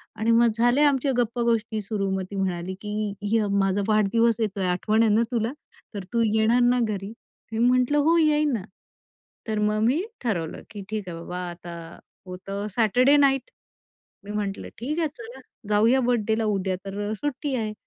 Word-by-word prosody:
आणि 225 +1 +1
मग 230 0 +5
झाल्या 245 +5 +4
आमच्या 270 0 0
गप्पा 240 0 0
गोष्टी 225 -2 0
सुरु. 200 -1 -2
मग 190 0 -1
ती - - -6
म्हणाली, 185 -1 -2
की 210 -1 -3
"ह्य 210 0 +1
माझा 195 +1 +1
वाढदिवस 220 +2 +3
येतोय. 205 -3 -1
आठवण 215 +5 +2
आहे 215 -2 +3
ना 230 - +4
तुला? 230 0 0 0.4
तर 200 -2 -5
तू 230 - +2
येणार 220 +3 +3
ना 245 +1 +3
घरी?" 205 -1 -3 0.4
मी 220 - -2
म्हंटलं, 250 +4 +3
"हो, 320 +4 +4
येईन 300 -2 +3
ना." 205 -5 -2 0.8
तर 215 -1 -1
मग 210 0 +1
मी 270 +9 +2 0.2
ठरवलं, 170 -9 -2
की 205 -2 -8
ठीक 210 -4 -4
आहे 165 - -6
बाबा. 175 +2 -7
आता 170 -1 -9 0.3
होतं 195 +3 -6
सॅटरडे 250 +5 +4
नाईट. 270 - +2 0.7
मी 205 - -8
म्हटलं, 205 -2 -3
"ठीक 300 +8 -3
आहे, 320 - +2
चला. 475 0 -10 0.3
जाऊया 225 +5 +4
बर्थडेला. 225 -2 +1
उद्या 195 -3 0
तर 195 +1 -5
अ, - - -2
सुट्टी 285 +2 -3
आहे." 215 -3 -2
220 Hz, 180 wpm, -25 LUFS, 200-245 Hz, 0.8 s, मग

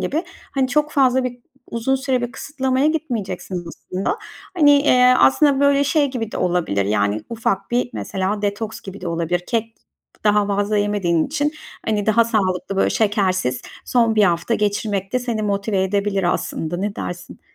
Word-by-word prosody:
gibi, 320 +5 -1 0.3
hani, 265 -2 0
çok 300 +3 +1
fazla 260 -2 +3
bi 245 -1 -5 0.3
uzun 235 +3 0
süre 265 -2 0
bir 240 +1 -3
kısıtlamaya 265 -1 -1
gitmeyeceksin 230 - -3
aslında. 195 - -4 0.4
Hani, 295 -3 +6
eee, 250 -3 +5
aslında 280 0 +4
böyle 280 0 +4
şey 285 -1 +2
gibi 225 -4 -4
de - - -3
olabilir, 170 - 0
yani, 100 +1 +1
ufak 225 -4 -2
bir 245 0 0
mesela 195 +1 -2
detoks 205 +2 -3
gibi 195 +1 -9
de 180 - -4
olabilir. 170 +1 -1
Kek 225 -1 -1 0.5
daha 210 -1 +3
fazla 205 +1 0
yemediğin 200 -6 +1
için, 295 +1 -1 0.3
hani, 210 -2 -1
daha 225 +2 +4
sağlıklı, 195 -4 -1
böyle, - - +2
şekersiz 185 - 0 0.2
son 230 -3 +2
1 215 - +4
hafta 175 +5 +1
geçirmek 205 -2 -1
de 255 - +2
seni 235 -3 -3
motive 200 -1 0
edebilir 195 -2 0
aslında, 160 +2 -3
ne 200 +3 -2
dersin? 175 0 -7
210 Hz, 165 wpm, -20 LUFS, 190-255 Hz, 0.5 s, Hani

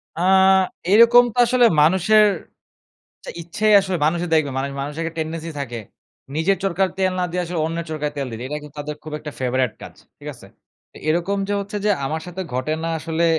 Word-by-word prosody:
আ - - -7 0.7
এইরকম 235 +3 +7
তো - - -16
আসলে 245 0 +3 0.2
মানুষের 190 +7 +4 1.0
চা - - -7
ইচ্ছাই 205 +6 +1
আসলে 190 -2 -2
মানুষই 170 +3 0
দেখবে। 155 -3 +2
মানে 135 +1 -1
মানুষের 145 +3 -5
একটা 165 -1 -5
টেনডেন্সি 160 +1 -4
থাকে। 120 -4 -5 0.6
নিজের 190 +5 +1
চরকার 190 0 +1
তেল 190 -1 +1
না 180 - +1
দিয়া 180 +1 -1
আসলে 170 -1 -4
অন্যের 165 +1 -4
চরকায় 150 -1 -3
তেল 140 -2 -2
দিতে। 115 0 -7
এটা 150 - -4
কিন্তু 150 0 -13
তাদের 150 0 -5
খুব 155 -1 -8
একটা 150 0 -7
ফেভারেট 130 -2 0
কাজ, - - -10 0.3
ঠিক - - -10
আছে? - - -15 0.4
তো - - -14
এরকম 175 +5 0
যে 205 - -1
হচ্ছে 205 +1 -5
যে - - +3 0.2
আমার 155 +3 -3
সাথে 180 +2 -6
ঘটে 130 +5 -1
না - - -1
আসলে 165 +1 -2
165 Hz, 195 wpm, -21 LUFS, 150-190 Hz, 1.0 s, এইরকম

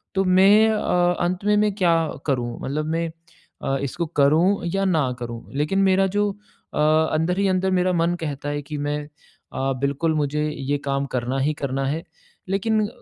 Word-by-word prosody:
तो 195 - +3
मैं 195 +4 +6
अ, 180 -4 +2
अंत 180 +2 -2
में 210 0 +4
मैं 210 -1 +2
क्या 175 -5 +3 0.3
करूँ? 120 -3 -1
मतलब 150 +3 -2
मैं 165 0 -1 0.6
अ, 135 0 0
इसको 165 +5 -2 0.2
करूँ 170 +7 +3
या 195 0 +1
ना 155 -9 +1
करूँ? 120 -1 -6
लेकिन 155 +7 +1
मेरा 190 0 +3
जो 205 0 +2 0.4
अ, - - -5 0.4
अंदर 160 +4 0
ही 200 - +2
अंदर 185 0 +1
मेरा 185 0 +2
मन 170 +1 +1
कहता 145 -2 -4
है 145 0 -2
कि 150 +1 -6
मैं 145 +1 -2 0.5
अ, 135 0 -1
बिल्कुल 140 +4 0
मुझे 150 +1 0
ये 145 0 -2
काम 140 0 0
करना 125 +2 -1
ही 150 +3 +1
करना 135 0 -1
है। 160 +4 -2 0.5
लेकिन 215 +2 +1
160 Hz, 180 wpm, -23 LUFS, 140-190 Hz, 0.6 s, मैं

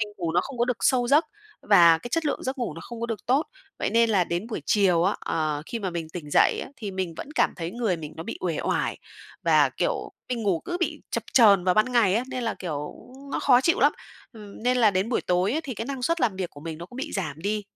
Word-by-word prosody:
mình 210 - -1
ngủ 170 -4 -2
nó 175 - +3
không 265 +1 -8
có 240 - +3
được 250 -2 -1
sâu 245 -2 +2
giấc 300 +4 +5 0.4
và 170 -5 +6
cái 240 - -8
chất 330 +5 -1
lượng 285 - -2
giấc 260 +1 -3
ngủ 230 -11 -3
nó 165 - -8
không 235 -1 -9
có 235 - -1
được 225 -5 -5
tốt. 270 +6 +2 0.3
Vậy - - -1
nên 230 0 +3
là 190 -5 +3
đến 175 +6 -3
buổi 235 - -5
chiều 185 -5 +3
á, 195 - +1
ờ, 155 -2 -2
khi 235 - -4
mà 190 -4 -3
mình 165 -2 -5
tỉnh 160 -3 -8
dậy - - +4
á, - - -11
thì 215 -6 -5
mình 185 -3 -3
vẫn - - -7
cảm - - +2
thấy 170 -1 -4
người 220 -5 -1
mình 155 -1 -8
nó 165 - -5
bị - - -6
uể 170 -4 -2
oải - - -1 0.4
và, - - +4
kiểu, - - -2 0.2
mình 240 -3 -2
ngủ 190 -5 +1
cứ 350 - -3
bị - - -2
chập - - -2
chờn 200 -7 +6
vào 180 - +3
ban 215 +4 +2
ngày 210 -6 +4
á, 235 +3 +1
nên 255 -1 -4
là, 225 - -1
kiểu, 150 -5 -5 0.4
nó - - -1
khó 250 -3 +5
chịu 335 +7 +2
lắm, - - +5 0.7
nên 250 +1 +2
là 225 -4 +5
đến 190 +3 0
buổi 245 - 0
tối 180 +4 +1
ấy 315 - 0
thì 275 -7 -6
cái 225 - -4
năng 270 -2 -5
suất 335 +5 0
làm 220 -6 +1
việc 185 -2 -3
của 145 - -13
mình 160 0 -6
nó 170 - -8
cũng 245 - -13
bị 290 +3 -5
giảm 155 -7 -3
đi. 210 +1 -1
210 Hz, 275 wpm, -25 LUFS, 175-245 Hz, 0.7 s, và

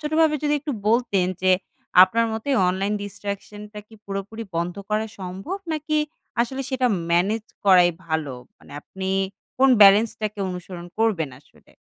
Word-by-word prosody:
ছোটভাবে 310 0 +2
যদি 295 0 +2
একটু 290 -1 -4 0.2
বলতেন 225 -5 +2 0.2
যে, 185 - +4 0.5
আপনার 230 +5 +3
মতে 220 +5 -5 0.2
অনলাইন 195 +3 -1
distraction 205 +1 -6
টা 210 - -8
কি 220 - -17
পুরোপুরি 200 +3 -5
বন্ধ 170 +1 -1 0.2
করা 215 +1 0
সম্ভব, 190 - -5 0.2
নাকি 310 0 -1 0.4
আসলে 265 +3 -1
সেটা 255 -1 +1 0.2
ম্যানেজ 205 +6 +1 0.2
করাই 180 -3 +6 0.2
ভালো? 160 -5 -2 0.2
মানে - - -16
আপনি 190 0 -6 0.5
কোন 270 +1 +5
ব্যালেন্সটাকে 210 +1 +4
অনুসরণ 180 -1 -7
করবেন 190 -11 +1
আসলে? 145 - -25
205 Hz, 140 wpm, -23 LUFS, 185-235 Hz, 0.5 s, করাই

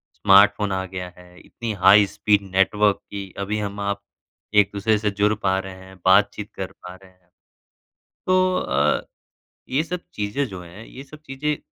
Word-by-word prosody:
Smartphone 100 0 +4
आ 95 0 -2
गया 90 -1 -6
है, 90 0 -17
इतनी 115 -2 -6
हाई 100 +2 +7
स्पीड 105 +1 +1
नेटवर्क 105 +1 +3
की 100 -2 -7
अभी 105 +2 -2
हम 100 0 -5
आप 100 0 -2 0.5
एक-दूसरे 105 +1 +3
से 105 0 -1
जुड़ 105 +1 +1
पा 95 0 +2
रहे 95 0 -7
हैं, 95 0 -14
बातचीत 100 +2 +3
कर 95 - -5
पा 90 0 -12
रहे 95 0 -18
हैं। 90 0 -33 1.1
तो 185 - +3 0.2
अ, - - +1 0.7
ये 135 +4 +1
सब 175 +1 -5
चीज़ें 105 +7 -2
जो 95 -4 -8
हैं, 90 +5 -12
ये 135 - -11
सब 150 +2 -14
चीज़ें 145 +2 -2
100 Hz, 170 wpm, -22 LUFS, 95-105 Hz, 1.1 s, हाई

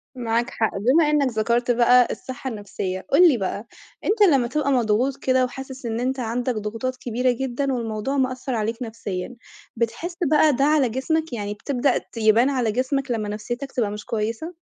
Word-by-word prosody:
معاك 235 0 -1
حق، 220 - 0
بما 285 +9 +3
إنك 295 -3 +3
ذكرت 235 +3 +1
بقى 245 +1 +5
الصحة 260 +1 -6
النفسية، 195 -3 -5
قُل 345 +5 +7
لي 255 - +2
بقى 200 +3 -4 0.4
أنت 425 +1 0
لمّا 245 -3 +2
تبقى 280 +1 0
مضغوط 245 +2 +1
كده 260 -1 +2
وحاسس 265 0 -8
إن 225 0 -2
أنت 260 +1 -1
عندك 245 +1 -1
ضغوطات 225 +5 -3
كبيرة 250 +1 0
جدًا 265 +2 -2
والموضوع 230 +3 -2
مأثر 255 -1 -1
عليك 225 +3 -2
نفسيًا، 220 -1 -5 0.4
بتحس 240 +10 -3 0.2
بقى 305 -1 +5
ده 275 - +1
على 295 -4 +3
جسمك؟ 310 +5 -1
يعني 205 -2 -3
بتبدأ 260 +4 0
ت - - -10
يبان 225 +4 +4
على 245 -5 0
جسمك 260 +2 -1
لمّا 215 -3 -2
نفسيتك 240 +6 -5
تبقى 220 -5 -1
مش 210 0 -7
كويسة؟ 230 +10 -3
245 Hz, 175 wpm, -23 LUFS, 225-270 Hz, 0.4 s, قُل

